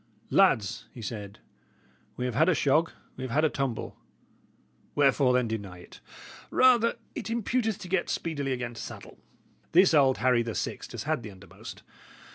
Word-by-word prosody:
"Lads," 125 - +3
he 120 - -10
said, 105 -2 -6 0.8
"we 125 - -2
have 125 - -2
had 160 +9 +3
a 180 - +3
shog, 150 +4 +2 0.3
we 130 - -6
have 130 - -4
had 150 +7 +2
a 155 - +1
tumble; 135 -5 -3 1.0
wherefore, 140 -2 +4
then, 125 -1 +2
deny 100 -5 -5
it? 90 - -14 0.5
Rather 240 -3 +4 0.2
it - - -6
imputeth 230 -1 -1
to 185 - -9
get 180 -1 0
speedily 145 -5 -2
again 125 -2 -3
to 115 - -8
saddle. - - -10 0.5
This 180 +1 +6
old 135 -4 +4
Harry 125 -2 +3
the 115 -2 -4
Sixt - - -4
has - - -5
had - - -1
the 110 - -8
undermost. 100 0 -12
135 Hz, 170 wpm, -28 LUFS, 115-170 Hz, 1.0 s, This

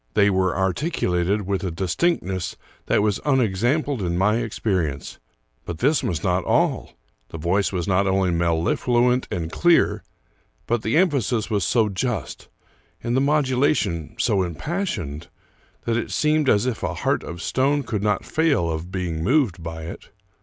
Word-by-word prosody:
They 100 0 +4
were 95 -1 +1
articu 95 - -1
lated 90 +4 +1
with 95 0 -2
a 95 - -1
distinctness 95 - -1 0.3
that - - +2
was 105 -2 +1
unexampled 130 +1 +1
in 85 -2 -1
my 105 +4 +3
experi 100 -8 -1
ence. 70 - -10 0.4
But 85 - -6
this 145 - +2
was 80 -4 -2
not 90 -1 +1
all. - - +1 0.4
The - - -7
voice 90 +5 +1
was 90 -3 -2
not 100 +1 +2
only 95 -1 +2
mel 85 -1 +1
lifluent 125 +8 +1
and 80 -2 -3
clear, 175 -1 +3 0.6
but 120 -1 0
the 110 +7 +1
emphasis 130 - +1
was 100 -3 +1
so 115 +4 +2
just, 105 - -3 0.6
and 120 +1 -1
the 130 - +3
modulation 130 - +1
so 110 -4 +2
impassioned, 90 - -3 0.6
that 115 0 +1
it 120 - -3
seemed 150 -2 +2
as 105 +3 +3
if 125 -3 -2
a - - -2
heart - - 0
of 85 - -7
stone 140 +8 +1
could 110 -4 -3
not 105 -1 0
fail 145 - +1
of 80 +3 -5
being 85 -4 -3
moved 120 - +2
by 80 0 -6
it. 80 - -9
100 Hz, 165 wpm, -23 LUFS, 90-130 Hz, 0.6 s, They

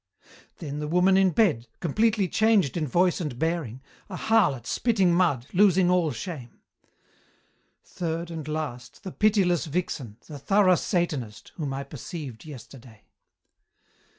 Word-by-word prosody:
"Then 150 -3 -6
the 150 - -3
woman 180 +4 +3
in 190 0 +4
bed, 155 - +1
completely 210 +4 +1
changed 215 - +2
in 160 -3 -1
voice 175 +7 +2
and 145 -7 -4
bearing, 150 -6 -2 0.3
a 185 - -6
harlot 180 - +2
spitting 195 -7 +1
mud, 165 -9 +2
losing 185 -2 +4
all 180 -3 +2
shame. 125 0 -7 1.2
"Third 170 0 -4
and 160 -3 -6
last, 150 -6 -5
the 190 - -6
pitiless 190 -6 +2
vixen, 145 -9 -4
the 150 -3 -9
thorough 195 +5 +4
Satanist, 155 - -2
whom 150 -5 -3
I 135 +1 -4
perceived 140 -2 -8
yesterday. 125 -5 -12
165 Hz, 130 wpm, -26 LUFS, 140-185 Hz, 1.2 s, in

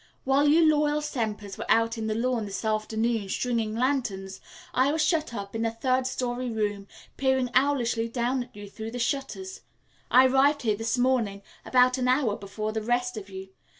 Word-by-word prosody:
"While 275 +2 +3
you 320 +3 +5
loyal 300 -1 +2
Sempers 220 -9 -4
were - - -4
out 230 0 +3
on 220 -1 -4
the 215 - -1
lawn 235 -1 0
this 200 +2 -5
afternoon, 220 0 -1
stringing 225 -1 -1
lanterns, 230 -7 -1 0.3
I 260 +3 +3
was 310 0 +1
shut 310 -2 +1
up 200 -2 -6
in 225 - -1
a 225 - +1
third 255 +3 0
story 250 -1 -3
room 205 -3 -2 0.3
peering 265 -2 +1
owlishly 245 -4 +1
down 245 +1 -1
at - - -26
you 205 0 -9
through 220 +2 -7
the 245 - -6
shutters. 275 +10 -3 0.5
I 255 +1 +7
arrived 270 +3 +3
here 215 -3 +2
this 225 +4 -2
morning, 240 -6 +1 0.2
about 255 0 +3
an 250 - 0
hour 255 -5 +2
before 215 +2 -5
the 220 0 -3
rest 245 +2 0
of 205 -2 -8
you. 190 0 -8
240 Hz, 185 wpm, -27 LUFS, 215-260 Hz, 0.5 s, I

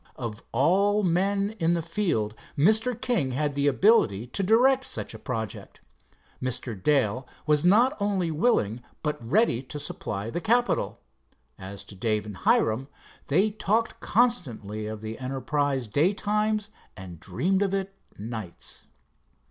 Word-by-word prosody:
Of 115 -3 -6
all 195 - +3
men 195 +3 +1
in 165 +1 +2
the 170 - -2
field, 165 - -1 0.2
Mr. 220 - +3
King 220 - 0
had 145 +2 0
the 140 +1 +1
ability 135 - +3
to 125 +10 -1
direct 250 +7 +4
such - - -3
a - - -9
project. 110 -6 -5 0.6
Mr. 130 -1 -2
Dale 125 +2 +1 0.2
was 150 0 +3
not 235 +10 +4
only 195 -5 0
willing 150 - +1 0.2
but 150 -5 -2
ready 130 - +2
to 135 +3 -7
supply 105 -5 -4
the 175 - -3
capital. 240 +6 +1 0.6
As 95 +1 -8
to - - -11
Dave 105 +1 -1
and 105 -3 -8
Hiram, 115 +5 +2 0.4
they 190 +9 +3
talked 220 +2 0
constantly 115 - 0
of 110 -1 -6
the 110 0 -6
enterprise 135 0 -1
daytimes 210 - +1 0.3
and 90 -4 -9
dreamed 175 - 0
of 200 -2 +1
it 195 0 -2 0.2
nights. 110 -4 -7
150 Hz, 140 wpm, -26 LUFS, -, 0.6 s, direct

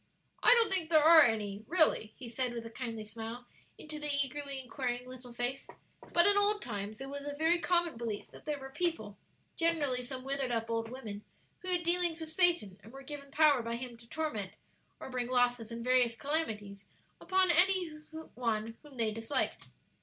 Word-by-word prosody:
"I - - +6
don't 460 -4 +3
think 345 -4 0
there 310 -2 +5
are 320 0 +9
any, 215 -5 +1
really," 315 -10 +2
he 255 - -8
said, 245 +1 -1
with 230 -1 -5
a 230 - -8
kindly 230 -3 -5
smile 225 +3 -7 0.3
into 305 0 -7
the 295 0 -3
eagerly 280 0 -5
inquiring 250 -1 -3
little 255 -1 -10
face; 245 +3 -3 0.4
"but 345 0 +5
in 405 - +6
old 410 +1 +3
times 210 - -5
it 270 - -5
was 285 0 -6
a 290 0 -4
very 325 +3 +3
common 345 -5 +1
belief 225 -3 -5
that - - -14
there 300 -1 -2
were 270 -1 -9
people 290 - -2 0.4
generally 305 -7 +1
some 255 +1 -6
withered 270 -1 -2
up 230 -1 -2
old 225 0 -1
women 215 -5 -7 0.4
who 370 - -11
had 355 -1 0
dealings 345 -1 +1
with 320 -1 -6
Satan, 320 - +2
and 215 +3 -14
were 270 +1 -10
given 285 -1 -8
power 295 -3 +4
by 230 0 -3
him 245 0 -6
to 230 0 -16
torment, 225 -12 -3 0.5
or - - -8
bring 250 -1 -2
losses 245 -2 +1
and 230 0 -5
various 250 -2 +3
calamities 220 -9 -3 0.4
upon 375 -1 +3
any 360 +1 +4 0.4
one 225 -2 -2
whom 290 -3 -15
they 225 -2 +1
disliked. 225 +6 -2
255 Hz, 190 wpm, -32 LUFS, 230-315 Hz, 0.5 s, are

